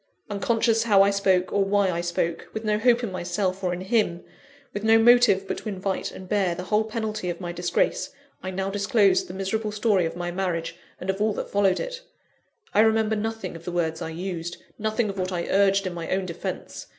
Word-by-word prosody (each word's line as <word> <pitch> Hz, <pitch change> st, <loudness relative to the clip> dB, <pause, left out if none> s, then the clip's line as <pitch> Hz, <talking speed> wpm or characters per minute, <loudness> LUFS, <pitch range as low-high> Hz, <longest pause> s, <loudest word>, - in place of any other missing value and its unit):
Unconscious 225 Hz, +1 st, +1 dB
how 200 Hz, -3 st, +6 dB
I 200 Hz, -, +3 dB
spoke, 190 Hz, -2 st, +2 dB
or 200 Hz, -, +3 dB
why 195 Hz, -1 st, +2 dB
I 170 Hz, 0 st, -2 dB
spoke; 170 Hz, -1 st, -2 dB
with 220 Hz, -, -4 dB
no 210 Hz, 0 st, +1 dB
hope 240 Hz, +1 st, +3 dB
in 225 Hz, -, -2 dB
myself, 185 Hz, +1 st, -2 dB
or 180 Hz, -, +1 dB
in 180 Hz, +1 st, -4 dB
him; 190 Hz, -4 st, 0 dB, 0.5 s
with 205 Hz, -, -4 dB
no 225 Hz, 0 st, +6 dB
motive 225 Hz, -4 st, +5 dB
but -, -, -3 dB
to 220 Hz, -, -6 dB
invite 190 Hz, -1 st, -3 dB
and 190 Hz, -, -10 dB
bear 190 Hz, -3 st, +1 dB
the 180 Hz, -, -5 dB
whole 210 Hz, +3 st, +1 dB
penalty 215 Hz, -3 st, -3 dB
of 170 Hz, -, -4 dB
my 175 Hz, -2 st, -4 dB
disgrace, 180 Hz, -, 0 dB, 0.3 s
I 185 Hz, -, -4 dB
now 190 Hz, +1 st, -2 dB
disclosed 200 Hz, -1 st, +3 dB
the 180 Hz, -, -8 dB
miserable 210 Hz, +3 st, -2 dB
story 205 Hz, -5 st, +2 dB
of 165 Hz, -, -7 dB
my 175 Hz, 0 st, -3 dB
marriage, 175 Hz, -3 st, -2 dB, 0.2 s
and 185 Hz, +2 st, -1 dB
of 195 Hz, +2 st, -7 dB
all 215 Hz, 0 st, +2 dB
that -, -, -5 dB
followed 200 Hz, -2 st, +3 dB
it. -, -, -5 dB, 0.7 s
I -, -, +3 dB
remember 220 Hz, 0 st, +4 dB
nothing 220 Hz, -4 st, -4 dB
of 165 Hz, -, -10 dB
the 180 Hz, -, -4 dB
words 165 Hz, -1 st, -1 dB
I 165 Hz, -, -3 dB
used 175 Hz, 0 st, -5 dB, 0.2 s
nothing 220 Hz, +1 st, 0 dB
of 195 Hz, -1 st, -5 dB
what 185 Hz, 0 st, -1 dB
I 175 Hz, -2 st, -2 dB
urged 195 Hz, 0 st, +3 dB
in 185 Hz, -, -3 dB
my 170 Hz, -1 st, -6 dB
own 190 Hz, 0 st, 0 dB
defence. 170 Hz, -2 st, -6 dB
195 Hz, 220 wpm, -25 LUFS, 180-215 Hz, 0.7 s, how